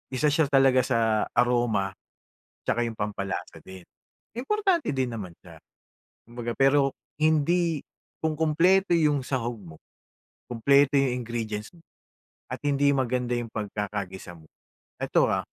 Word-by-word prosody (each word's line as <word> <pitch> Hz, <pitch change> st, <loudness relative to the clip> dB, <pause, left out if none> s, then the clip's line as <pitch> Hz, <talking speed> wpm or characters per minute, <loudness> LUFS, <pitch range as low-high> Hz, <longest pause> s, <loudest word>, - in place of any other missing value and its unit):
Isa 130 Hz, +3 st, +1 dB
siya 155 Hz, +2 st, +3 dB
talaga 135 Hz, -2 st, +5 dB
sa 115 Hz, -4 st, +1 dB
aroma, 120 Hz, -6 st, +1 dB, 0.7 s
'tsaka 120 Hz, -, +1 dB
'yong 115 Hz, -2 st, -6 dB
pampalasa 100 Hz, -2 st, -4 dB
din. 95 Hz, -1 st, -11 dB, 0.5 s
Importante 375 Hz, -, 0 dB
din 130 Hz, -2 st, 0 dB
naman 105 Hz, -6 st, -6 dB
siya, -, -, -14 dB, 0.7 s
kumbaga. 120 Hz, 0 st, -5 dB
Pero 135 Hz, 0 st, +4 dB, 0.3 s
hindi 160 Hz, +1 st, +2 dB, 0.4 s
kung 160 Hz, -1 st, 0 dB
kumpleto 165 Hz, +5 st, +3 dB
'yong 150 Hz, -4 st, +2 dB
sahog 120 Hz, -2 st, -2 dB
mo, 85 Hz, -5 st, -13 dB, 0.7 s
kumpleto 140 Hz, +4 st, +3 dB
'yong 125 Hz, -2 st, 0 dB
ingredients 110 Hz, -2 st, -4 dB
mo, -, -, -18 dB, 0.7 s
at -, -, -4 dB
hindi 140 Hz, 0 st, +3 dB
maganda 125 Hz, -1 st, -1 dB
'yong 120 Hz, -1 st, -6 dB
pagkakagisa 100 Hz, -4 st, -5 dB
mo 80 Hz, -, -18 dB, 0.6 s
ito, -, -, +3 dB
ah, -, -, +1 dB
125 Hz, 125 wpm, -26 LUFS, 110-145 Hz, 0.7 s, talaga